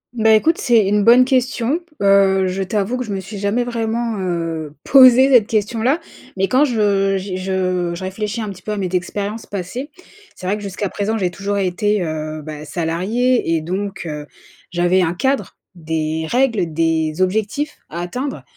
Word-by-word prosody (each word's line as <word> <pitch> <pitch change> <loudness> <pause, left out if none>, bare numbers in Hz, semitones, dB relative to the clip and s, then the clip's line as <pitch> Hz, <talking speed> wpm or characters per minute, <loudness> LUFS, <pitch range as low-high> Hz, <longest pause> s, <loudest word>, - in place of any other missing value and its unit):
Bah, 220 -1 +3
écoute 320 +10 +2
c'est 230 -6 +3
une 205 +1 +2
bonne 245 +4 +7
question, 255 +2 0 0.2
heu, 195 -1 +4
je 185 +1 -2
t'avoue 205 +5 -1
que 255 - -2
je 220 - -7
me 195 - -2
suis 200 +2 -8
jamais 205 +5 0
vraiment, 230 -1 -2
heu, 165 -4 -3
posée 260 -1 +7
cette 235 -5 +6
question-là. 225 +7 0 0.4
Mais 195 +1 +1
quand 260 +6 +4
je 200 -6 +1
j'y 190 0 -5
je 185 -2 -1
je 175 - -7
réfléchis 210 +4 -4
un 215 -2 -3
petit 190 -2 -9
peu 215 - -5
à - - -4
mes 190 -2 -2
expériences 205 +4 -3
passées, 205 - -5 0.5
c'est - - -10
vrai 195 +3 +1
que 210 - -7
jusqu'à 200 +1 -3
présent 205 +3 -2
j'ai 185 -4 -1
toujours 200 +2 -3
été, 200 +1 0
heu, 155 -1 -4
bah 150 0 -7
salariée 180 +7 0
et 160 - 0
donc 195 +5 -4
heu, 150 -2 -6 0.4
j'avais 175 +2 +2
un 170 -1 0
cadre, 265 +8 -1 0.2
des 160 -1 -3
règles, 230 -9 +1
des 160 0 0
objectifs 220 +10 -2
à 170 +2 -5
atteindre. 255 +11 -4
200 Hz, 180 wpm, -19 LUFS, 175-230 Hz, 0.5 s, bonne